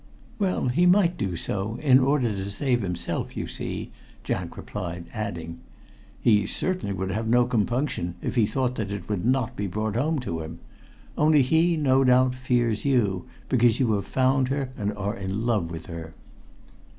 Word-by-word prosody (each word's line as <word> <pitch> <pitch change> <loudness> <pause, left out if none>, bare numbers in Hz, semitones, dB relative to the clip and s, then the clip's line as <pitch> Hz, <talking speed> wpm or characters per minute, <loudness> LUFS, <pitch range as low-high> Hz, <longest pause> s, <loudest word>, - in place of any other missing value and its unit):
"Well, 185 -9 +1
he 175 +8 +3
might 180 -1 +4
do 95 - -2
so, 100 +6 -3
in 135 -4 +5
order 135 -2 +2
to 100 -1 -4
save 120 +4 0
himself, 90 -3 -3
you - - -2
see," - - -5 0.3
Jack - - -3
replied, 85 -3 -5
adding: 85 -7 -5 0.6
"He 105 -4 +3
certainly 185 - -1
would 95 0 -2
have 110 +3 -2
no 120 +2 +4
compunction 120 - -1
if - - -3
he 115 -4 +3
thought 130 0 0
that 100 -3 -3
it 100 0 -5
would 100 -4 -2
not 130 -3 +1
be 100 - -2
brought 110 +3 -2
home 150 +6 +1
to 85 -9 -4
him. 80 +1 -7 0.6
Only 150 -2 +5
he, 160 +5 +3
no 135 -3 +3
doubt, 125 0 +4
fears 120 -4 0
you, 105 -10 +1 0.2
because 120 -3 +3
you 125 -4 +2
have 100 -2 -2
found 130 0 +2
her, 135 -1 -2
and 105 0 -2
are 105 +2 -2
in 100 +2 -3
love 105 -8 +1
with 80 -1 -7
her." 80 -2 -8
115 Hz, 175 wpm, -25 LUFS, 100-130 Hz, 0.6 s, in